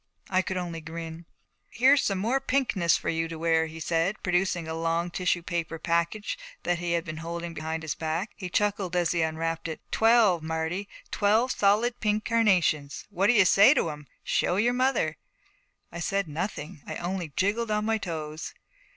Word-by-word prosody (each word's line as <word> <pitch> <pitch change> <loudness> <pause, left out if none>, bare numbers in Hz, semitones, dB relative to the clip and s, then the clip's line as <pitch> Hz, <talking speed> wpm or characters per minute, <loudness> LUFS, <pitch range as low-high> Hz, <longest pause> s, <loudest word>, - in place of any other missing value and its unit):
I 185 0 +3
could 190 0 -4
only 170 -2 -4
grin. 165 +1 -7 0.4
'Here's 270 +4 +4
some 195 - 0
more 230 +8 +1
pinkness 245 -11 +2
for - - -4
you 165 0 0
to 165 0 -7
wear,' 160 0 +2
he 160 +1 -9
said, 165 +5 -1
producing 180 -2 0
a 160 - -3
long 165 +1 -1
tissue 180 -1 0
paper 170 -2 -3
package 170 - -1 0.2
that 175 -1 0
he 175 -1 -1
had 170 0 0
been 155 -2 -6
holding 170 +1 -5
behind 160 0 -4
his 160 - -2
back. 165 +6 -3
He 185 -3 -6
chuckled 200 -2 0
as 175 -2 +2
he 170 - +1
unwrapped 165 +1 -2
it. 160 - -5
'Twelve, 220 -6 +4
Marty; 160 +5 -3 0.2
twelve 220 +5 +2
solid 220 +5 +2
pink 215 -1 0
carnations. 180 -11 +2
What 195 +3 +2
do 245 - +5
you 210 -5 +6
say 205 +10 +7
to 165 - +1
'em? 150 -1 -10 0.2
Show 175 - +1
your 230 +5 +2
mother.' 260 +2 +1 0.7
I 170 - -7
said 195 +2 -1
nothing. 155 0 -5
I - - -4
only 175 -2 -4
jiggled 215 +4 0
on 210 0 0
my 220 0 +1
toes. 160 -4 -5
175 Hz, 185 wpm, -27 LUFS, 165-205 Hz, 0.7 s, say